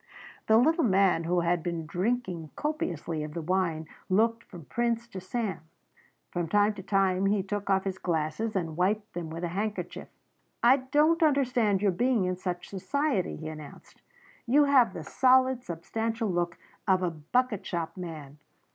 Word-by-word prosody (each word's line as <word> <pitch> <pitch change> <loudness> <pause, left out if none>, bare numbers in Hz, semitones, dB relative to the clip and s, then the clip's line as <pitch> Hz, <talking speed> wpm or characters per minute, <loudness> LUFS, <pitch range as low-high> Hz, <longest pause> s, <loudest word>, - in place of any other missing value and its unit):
The 220 - +6
little 320 +8 +3
man 190 -5 +3
who 175 +1 +1
had 170 0 +1
been 170 -1 -3
drinking 180 -2 -2
copiously 300 - -3
of 150 +1 -7
the 170 - -2
wine 170 -3 0 0.2
looked 230 +4 +2
from 170 -6 -12
Prince 235 +3 -1
to 190 -4 -7
Sam. 195 -1 -3 0.7
From 175 -2 -2
time 205 +3 +3
to 200 - -8
time 195 -1 +1
he 200 -1 +1
took 205 +1 -4
off 190 -1 +3
his 190 -1 -4
glasses 170 +6 -2
and 165 -4 -2
wiped 205 +5 0
them 170 -2 -5
with 165 +2 -6
a 175 - -1
handkerchief. 205 +4 -4 0.6
"I 250 +3 +7
don't 300 +6 +2
understand 250 - +2
your 200 - +4
being 235 +2 +1
in 180 0 -1
such 180 -1 -4
society," 205 - -1
he 155 - -7
announced; 155 -2 -10 0.5
"you 285 +5 +5
have 260 -8 +4
the 165 - -5
solid, 260 - +3
substantial 225 +6 -3
look 175 0 -1 0.3
of 185 -1 +3
a 175 - 0
bucket 210 +8 -1
shop 165 -1 -4
man. 155 -5 -8
195 Hz, 165 wpm, -28 LUFS, 170-235 Hz, 0.7 s, I